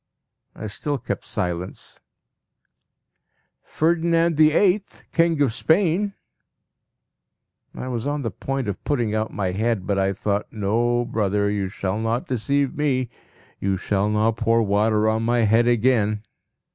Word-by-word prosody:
I - - -7
still 140 +7 -3
kept - - -5
silence. 90 0 -4 1.6
"Ferdinand 165 +1 +1
the 155 0 +5
Eighth, 195 +4 +1
King 165 -2 +2
of 125 -6 0
Spain!" 190 - +1 1.6
I 130 - -6
was 120 0 -3
on 145 0 -2
the 115 - -2
point 135 +5 -3
of 100 - -4
putting 120 -7 0
out 110 0 -1
my 95 -3 -2
head, 110 0 -1
but 100 -1 0
I 95 0 +1
thought, 100 +1 -2
"No, 120 +3 0
brother, 105 -2 0
you 100 -2 -2
shall 95 +2 -3
not 115 +2 -1
deceive 140 +3 0
me! 130 -5 0 0.5
You 95 -1 0
shall 100 +2 0
not 110 +2 +1
pour 115 0 +2
water 105 +1 +2
on 110 +1 +1
my 120 +1 +2
head 115 +2 +3
again!" 110 -3 +2
115 Hz, 140 wpm, -23 LUFS, 105-140 Hz, 1.6 s, the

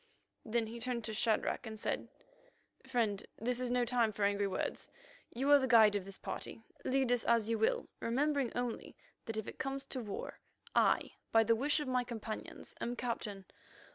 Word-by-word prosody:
Then 230 0 0
he 230 +2 -7
turned 240 -1 -2
to 220 - -3
Shadrach 220 +1 +1
and 220 -1 -6
said: - - -2 0.8
"Friend, 225 -6 +1
this 245 +2 0
is 250 -1 -1
no 245 0 +2
time 235 -2 +2
for 205 -1 -3
angry 200 0 +2
words. 190 - -3 0.4
You 270 +4 +1
are 290 - +9
the 260 - 0
guide 220 -4 +7
of 200 -2 -1
this 195 0 -9
party; 225 - -6 0.2
lead 260 -1 +2
us 245 -2 +2
as 230 -1 +3
you 225 - +1
will, 220 - +2
remembering 275 +1 +1
only 245 -1 -3 0.3
that 225 -1 -3
if 220 - -3
it - - -8
comes 270 0 -2
to 260 - -2
war, 205 -3 -6 0.3
I, - - +3 0.2
by 225 0 +6
the 230 +1 +4
wish 290 +6 +1
of 295 - -3
my 255 -1 +2
companions, 225 -2 -6
am 240 - -1
Captain. 215 -5 -3
235 Hz, 190 wpm, -35 LUFS, 220-250 Hz, 0.8 s, are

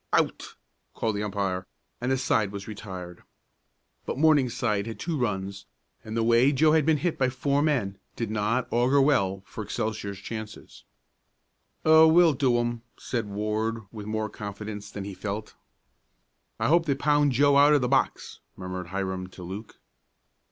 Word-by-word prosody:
"Out!" - - 0 0.4
called 110 -2 -1
the 100 - -2
umpire, 95 -3 -2 0.3
and 125 +2 0
the 130 - +2
side 110 -5 +1
was 100 -1 -7
retired. 95 -5 -8 0.9
But - - -3
Morningside 125 -8 +2
had 115 - -6
two 165 -1 -2
runs, 100 -6 -3 0.4
and 110 +1 -5
the 115 - +2
way 120 +4 +4
Joe 155 +3 +4
had 155 -1 +3
been 160 -1 +4
hit 165 +3 -2
by 130 -1 +3
four 140 +3 0
men 125 -11 0 0.2
did 115 -3 -3
not 110 +4 0
augur 125 +4 +3
well 100 -9 +2
for 110 - -7
Excelsior's 105 -1 -3
chances. 110 +1 -8 1.0
"Oh, 160 0 +8
we'll 165 0 +6
do 130 -3 +2
'em!" 120 -1 -2 0.2
said 115 -4 -3
Ward, 110 +2 -2
with 105 -2 -8
more 110 0 -1
confidence 105 0 -7
than 100 - -6
he 100 0 -6
felt. 105 +2 -5 1.1
"I - - +1
hope 165 +1 +3
they 140 - +2
pound 145 0 +2
Joe 140 +3 +4
out 145 +1 +6
of 145 - +3
the 125 - +1
box," 135 +1 0 0.2
murmured 90 -1 -6
Hiram 95 0 -3
to 95 0 -12
Luke. 100 +5 -8
110 Hz, 165 wpm, -26 LUFS, 100-135 Hz, 1.1 s, Oh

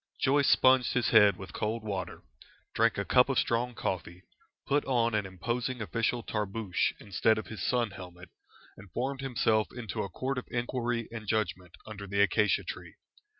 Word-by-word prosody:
Joyce 140 +1 +3
sponged 130 -1 +5
his 120 -6 +1
head 105 -4 +6
with 95 - -9
cold 110 +1 -2
water, 100 -3 -5 0.5
drank 115 0 +2
a 100 - -1
cup 125 +1 +4
of 135 - 0
strong 120 +1 0
coffee, 90 -2 -4 0.4
put 145 +1 +1
on 120 -3 +1
an 105 -2 0
imposing 120 +7 -3
official 115 +3 -1
tarboosh 105 -3 -1
instead 110 +3 +1
of 110 - -4
his 110 - -8
sun 120 -4 0
helmet, 90 -2 -11 0.5
and 95 -1 -14
formed 135 +2 -2
himself 115 -5 +1
into 120 -3 -5
a 100 - -4
court 130 +6 -3
of - - -11
inquiry 120 -1 -2
and 110 -2 -7
judgment 95 -5 -2
under 105 -2 -8
the 100 +1 -2
acacia 100 +1 +3
tree. - - -8
110 Hz, 170 wpm, -30 LUFS, 100-125 Hz, 0.5 s, head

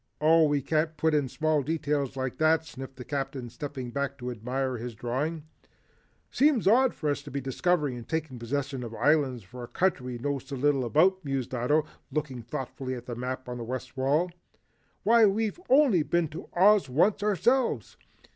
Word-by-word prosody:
"Oh, 160 +1 +5
we 145 -2 0
can't 155 +2 0
put 160 +1 +2
in 145 -3 +1
small 155 +1 +1
details 145 -2 -1
like 130 -1 -3
that," 160 0 +3
sniffed 135 -4 -9
the 125 - -9
Captain 135 -4 -4
stepping 135 -4 -6
back 140 +1 -2
to 125 0 -5
admire 125 +3 -2
his 120 0 -6
drawing. 140 +8 -2 0.9
"Seems 275 -6 +3
odd 250 +4 +4
for 150 -2 -1
us 145 - -2
to - - -10
be 140 - -3
discovering 145 +1 0
and 120 - -10
taking 155 -6 -3
possession 135 +2 -3
of 115 -1 -7
islands 130 -1 +2
for 125 +6 -10
a - - -7
country 130 -9 0
we - - -4
know 140 +3 -2
so 135 +2 -8
little 135 -1 +1
about," 185 +9 +3
mused 135 -3 -3
Ato, 145 +6 +2 0.3
looking 145 -5 -3
thoughtfully 130 +2 -5
at 120 -1 -9
the 125 - -5
map 130 +2 -4
on 125 0 -5
the - - -4
west 130 +3 -5
wall. 145 +7 +1 0.7
"Why, 225 0 +6
we've 215 - -1
only 260 - +5
been 170 +1 0
to 155 - -9
Oz 200 -1 +5
once 185 +11 +2
ourselves." 210 - +1
140 Hz, 185 wpm, -28 LUFS, 125-160 Hz, 0.9 s, Why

